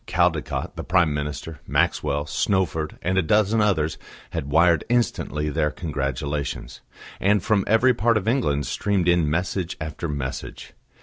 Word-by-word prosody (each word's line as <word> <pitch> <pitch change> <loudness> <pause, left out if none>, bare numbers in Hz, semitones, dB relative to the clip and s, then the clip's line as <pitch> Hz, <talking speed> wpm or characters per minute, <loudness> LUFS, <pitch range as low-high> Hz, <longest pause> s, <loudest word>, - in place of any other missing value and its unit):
Caldecott, - - 0
the - - -4
Prime 85 0 +2
Minister, 75 +1 -5
Maxwell, 70 +1 +1
Snowford 80 0 -1
and 95 +2 +1
a - - +4
dozen 105 +5 +2
others 80 -7 +1 0.3
had 70 - -4
wired 80 +1 +4
instantly 95 -10 0
their 75 0 +1
congratulations, 70 -2 -4 0.4
and 100 0 +2
from 105 -3 +2
every 115 +4 +4
part 115 0 +2
of 105 0 -3
England 75 - +1
streamed 100 +5 0
in 85 -3 +3
message 90 +2 -2
after 80 +2 -4
message. 70 -3 -5
85 Hz, 140 wpm, -24 LUFS, 75-100 Hz, 0.4 s, a